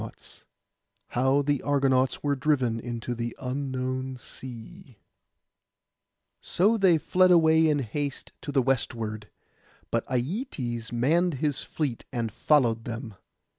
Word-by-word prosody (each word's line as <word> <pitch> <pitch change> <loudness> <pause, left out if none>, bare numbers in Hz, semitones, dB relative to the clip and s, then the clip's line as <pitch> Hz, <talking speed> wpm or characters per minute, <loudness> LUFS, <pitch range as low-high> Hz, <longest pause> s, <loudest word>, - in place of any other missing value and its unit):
PART - - -8
V - - -14 0.6
HOW 130 +3 +2
THE 145 -1 0
ARGONAUTS 135 -2 +2
WERE 145 -1 +1
DRIVEN 130 -5 +1
INTO 120 0 -4
THE 120 0 -4
UNKNOWN 130 0 -3
SEA 130 - -10 1.4
So 205 +6 +2
they 190 -6 +5
fled 185 +4 +3
away 160 -2 +5
in 150 -1 +3
haste 140 +2 -4
to 145 - -5
the 135 -2 +2
westward; 110 -4 -2 0.6
but - - +1
Aietes 125 - -3
manned 155 +8 +2
his 145 +1 -1
fleet 140 -7 -3
and 115 -3 -2
followed 115 -4 +2
them. 115 -1 -5
130 Hz, 125 wpm, -27 LUFS, 120-150 Hz, 1.4 s, they